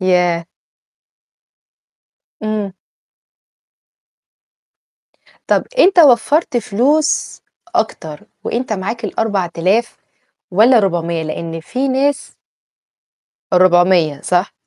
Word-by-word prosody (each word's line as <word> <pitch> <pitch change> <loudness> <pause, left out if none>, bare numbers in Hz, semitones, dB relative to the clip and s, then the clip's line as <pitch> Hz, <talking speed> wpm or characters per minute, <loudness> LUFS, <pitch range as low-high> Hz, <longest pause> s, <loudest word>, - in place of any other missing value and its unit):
ياه! 180 -2 +1 1.9
امم. 215 -2 -3 2.7
طب - - +1
أنت 380 -5 +4
وفّرت 290 0 +4
فلوس 280 +9 0 0.3
أكتر 155 -3 -3 0.2
وأنت 240 -1 -3
معاك 215 +4 -4
ال4000 195 +1 -1 0.6
والّا 230 +5 +5
400؟ 170 -4 -1
لأن 165 +1 -5
في 255 +11 -3
ناس 270 +2 -1 1.2
ال400 175 -4 +3
صح؟ 180 +2 0
195 Hz, 70 wpm, -16 LUFS, 175-245 Hz, 2.7 s, والّا